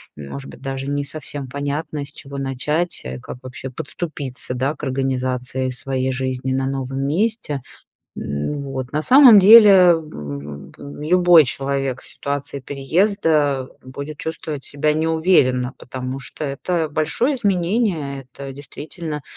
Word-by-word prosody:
может 75 - -8
быть, - - -12
даже 135 0 -4
не 145 0 -1
совсем 145 -2 -6
понятно, 145 +2 -3
с 140 - -8
чего 140 -2 -7
начать, 150 +6 -1
э, 65 0 -5
как 95 - -8
вообще 130 +1 -7
подступиться, 135 -2 -6
да, 135 +4 0
к 150 - -15
организации 130 -1 -1
своей 130 +1 -2
жизни 130 0 -2
на 130 0 0
новом 135 0 -3
месте, 175 - -1 0.6
м, 75 - -3
вот. 130 -2 -5
На 150 +1 0
самом 255 - +9
деле, 195 -3 +9
в 75 - -6 0.3
в - - -18
в 145 +1 -9
любой 175 0 +6
человек 135 0 -2
в - - -14
ситуации 140 0 -4
переезда 145 - +1
будет 140 +3 -8
чувствовать 155 -3 -5
себя 150 +1 0
неуверенно, 155 -6 +2
потому 130 +1 -5
что 155 - -7
это 160 +4 -1
большое 160 - 0
изменение, 180 - 0
это 140 -1 -7
действительно, 150 +2 -7
140 Hz, 140 wpm, -21 LUFS, 130-160 Hz, 0.6 s, самом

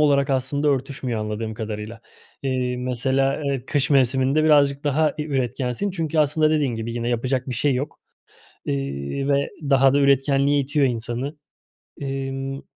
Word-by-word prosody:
olarak 140 -2 +3
aslında 135 +3 0
örtüşmüyor 130 -4 -1
anladığım 110 +1 -4
kadarıyla. 110 +1 -6 0.4
Eee, 130 -2 -1
mesela, 130 +3 0
eee, 135 -3 -2
kış 145 -1 0
mevsiminde 135 +2 +3
birazcık 145 -2 +4
daha 150 +1 +1
bir 150 0 -4
üretkensin 130 - -1
çünkü 165 -4 -2
aslında 155 +1 +3
dediğin 145 -6 +1
gibi 115 +1 -4
yine 120 0 -2
yapacak 125 +2 -1
bir 125 - -2
şey 140 +3 +1
yok. 140 +4 -4 0.6
İii, 70 - -3
ve 140 0 +1 0.2
daha 135 0 +5
da 145 - +3
üretkenliğe 140 +1 +3
itiyor 140 +1 +1
insanı. 120 +4 -3 0.6
Emm 135 0 -4
135 Hz, 145 wpm, -23 LUFS, 125-145 Hz, 0.6 s, daha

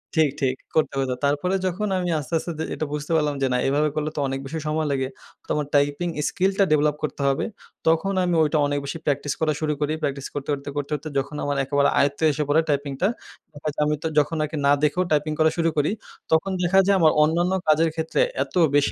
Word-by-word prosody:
ঠিক, 160 -2 +4
ঠিক 130 -1 +1 0.2
করতে 155 -3 +1
হতো। 130 -1 -1
তারপরে 145 +7 +1
যখন 185 +4 -1
আমি 180 -1 -1
আস্তে, 150 +3 -8
আস্তে 170 - -5
দে 160 - -2
এটা 155 - -2
বুঝতে 150 +1 -4
পারলাম 150 -2 +1
যে 135 - +3
না - - +2
এভাবে 150 +3 +2
করলে 155 0 -1
তো - - -2
অনেক 135 0 -3
বেশি 160 +4 -4
সময় 155 +1 0
লেগে, 135 -1 0 0.4
তো - - -26
আমার 150 -1 -1
টাইপিং 145 +4 +2 0.2
স্কিলটা 195 +1 +1
ডেভেলপ 150 -1 +3
করতে 150 - -3
হবে। 135 - 0 0.4
তখন 165 +5 +2
আমি 175 -1 +1
ওইটা 155 0 +1
অনেক 145 0 -1
বেশি 140 - -4
প্র্যাকটিস 145 -1 0
করা 155 -1 +2
শুরু 155 -1 0
করি, 150 +1 +1
প্র্যাকটিস 140 -1 -2
করতে, 145 -1 -5
করতে, 140 0 -5
করতে, 145 +1 -2
করতে 150 +2 -7
যখন 140 +2 -2
আমার 145 -1 -1
একেবারে 140 +1 +2
আয়ত্তে 140 +2 +1
এসে 150 +1 -1
পড়ে 155 +3 +4
টাইপিংটা 140 +4 0 0.6
হয়তো 150 -1 -3
আমি 150 0 +1
তো - - 0
যখন 150 +3 0
আরকি 155 +1 -4
না - - +5
দেখেও 150 +5 +2
টাইপিং 150 0 +1
করা 160 0 +5
শুরু 165 -1 +2
করি 145 0 +2 0.4
তখন 160 +5 +2
দেখা 180 +2 +4
যায় 200 - +5
আমার 160 -2 +6
অন্যান্য 170 +4 +1 0.2
কাজের 155 +2 +4
ক্ষেত্রে 160 - 0 0.2
এত - - -16 0.2
বেশি 145 0 +3
150 Hz, 220 wpm, -23 LUFS, 145-160 Hz, 0.6 s, আমার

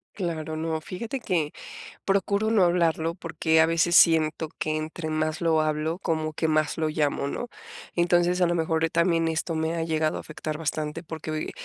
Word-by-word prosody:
Claro, 160 -4 -3
no. 160 0 -2
Fíjate 230 - -5
que 160 -8 -1 0.5
procuro 200 +2 +1
no 215 -4 +4
hablarlo, 165 -2 +2
porque 160 -2 0
a 160 - +7
veces 165 +1 +2
siento 160 -1 +4
que 155 0 -1
entre 155 +1 -4
más 155 +1 -1
lo 160 -2 +3
hablo, 155 +3 -1
como 155 -3 -1
que 160 +1 -1
más 155 -1 +1
lo 160 -1 0
llamo, 150 -2 0
¿no? 245 +12 -4 0.5
Entonces, 175 +1 +3
a 180 - +4
lo 175 - 0
mejor 160 0 +1
también 165 0 +2
esto 160 +1 -1
me 160 +1 -1
ha 165 - -1
llegado 155 -1 0
a - - -5
afectar 155 0 -5
bastante 155 +1 -3
porque, 160 -1 -6
uy, 155 0 -3
160 Hz, 185 wpm, -26 LUFS, 155-170 Hz, 0.5 s, a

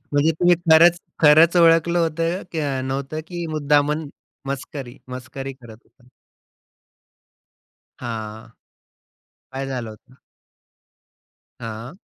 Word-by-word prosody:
म्हणजे 145 +2 +2
तुम्ही 175 +3 +3 0.2
खरंच 170 +2 +7 0.2
खरंच 160 +3 +6
ओळखलं 170 0 +4
होतं 165 +2 -1
का 145 -5 -2
नव्हतं 135 +3 -4
की 175 -1 -5
मुद्दामन 150 0 +1 0.4
मस्करी 135 -2 -6
मस्करी 130 +2 -7
करत 120 -4 -14
होता? 125 - -28 1.9
हां. 110 -2 -6 1.0
काय 135 +1 -4
झालं 125 -4 -4
होतं? 125 +4 -16 1.4
हां. 115 +6 -7
145 Hz, 95 wpm, -22 LUFS, 130-165 Hz, 1.9 s, खरंच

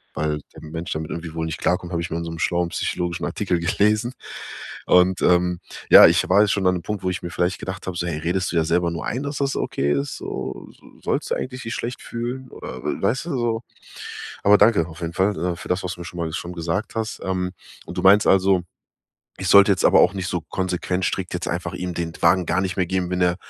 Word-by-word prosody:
Weil 75 -1 -1
der - - -11
Mensch 80 +2 -6
damit 80 0 -4
irgendwie 85 -1 -5
wohl 80 - -2
nicht 80 0 -4
klarkommt, 90 -1 0
hab 85 - 0
ich 85 0 -4
mal 80 - -1
in 85 - -4
so 85 - -5
'nem 80 - -6
schlauen 85 0 +1
psychologischen 85 0 -2
Artikel 95 -4 -1
gelesen. 105 +7 +1 0.7
Und, 90 0 +4
ähm, 90 0 +3 0.3
ja, - - +11
ich - - +2
war 100 +3 +6
jetzt 105 - +3
schon 95 -2 +1
an 90 - +3
’nem 85 - -5
Punkt, 105 -2 -4
wo 95 - +1
ich 90 - -5
mir 85 - -5
vielleicht 90 +2 0
gedacht 95 0 -6
hab, 90 - -3
so: 85 - -1
„Hey, 80 -3 -2
redest 90 +3 -1
du - - -4
dir 80 - +4
selber 85 +1 +1
nur 85 -2 -4
ein, 130 +5 -2
dass 140 -1 -4
das 140 -1 0
okay 70 +1 -1
ist 70 0 -2
so? 65 0 -6
So - - -23 0.2
sollst - - -2
du - - +3
eigentlich 130 0 -5
dich 115 +1 -4
schlecht 120 +2 -4
fühlen?” 125 +3 -5
Oder, - - -8
äh, - - -3
weißt 130 +6 0
du 170 -5 -3
so? 115 -1 0 0.8
Aber 105 +1 +7
danke 100 -6 +4
auf 80 0 -11
jeden 85 0 -3
Fall, 95 +2 +1
äh, 90 +1 -1
für - - -9
das, 90 +2 0
was 90 - -3
du 90 - -10
mir - - -7
schon 90 - -8
mal 80 -1 -2
schon 90 0 -4
gesagt 85 +5 -3
hast. 110 0 -3
Ähm, 90 -1 -1 0.4
und - - -8
du - - -1
meinst 100 +2 +6
also, 95 -1 +4 0.8
ich 95 -2 -2
sollte 100 0 +8
jetzt 90 - -3
aber - - +6
auch - - +4
nicht 95 -2 -3
so 90 - -1
konsequent 90 +2 -2
strikt 95 -1 -2
jetzt 90 - -3
einfach 85 +1 -3
ihm 90 -1 -4
den 85 -1 -3
Wagen 90 +1 +4
gar 95 +2 +1
nicht 95 -2 -3
mehr 90 - +2
geben, 90 -1 -1
wenn 90 - -1
er 90 -1 +3
90 Hz, 255 wpm, -23 LUFS, 85-100 Hz, 0.8 s, ja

